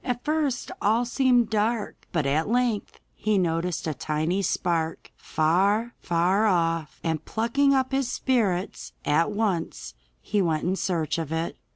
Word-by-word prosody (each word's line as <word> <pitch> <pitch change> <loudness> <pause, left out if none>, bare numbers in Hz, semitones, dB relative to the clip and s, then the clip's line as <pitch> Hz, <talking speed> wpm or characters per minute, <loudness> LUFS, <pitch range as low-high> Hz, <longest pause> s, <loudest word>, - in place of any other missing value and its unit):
At 245 -1 -3
first 300 -4 0
all 225 +4 +2
seemed 245 -2 +2
dark, 215 0 -1
but 160 -4 0
at 155 +6 +1
length 240 -3 0
he 215 -1 0
noticed 170 -1 0
a 155 - -1
tiny 155 +6 -1
spark 165 -3 -1
far, 200 +9 +1
far 180 +5 +2
off, 165 -5 0
and, 160 -2 -1
plucking 275 - +2
up 260 -1 +1
his 270 -2 0
spirits, 210 -10 -1
he - - -1
at 165 +5 +3
once 205 -6 -2 0.4
went 170 -7 +2
in 185 +2 +1
search 170 -4 -1
of 160 -2 -4
it. 165 +1 -2
195 Hz, 150 wpm, -26 LUFS, 165-235 Hz, 0.4 s, at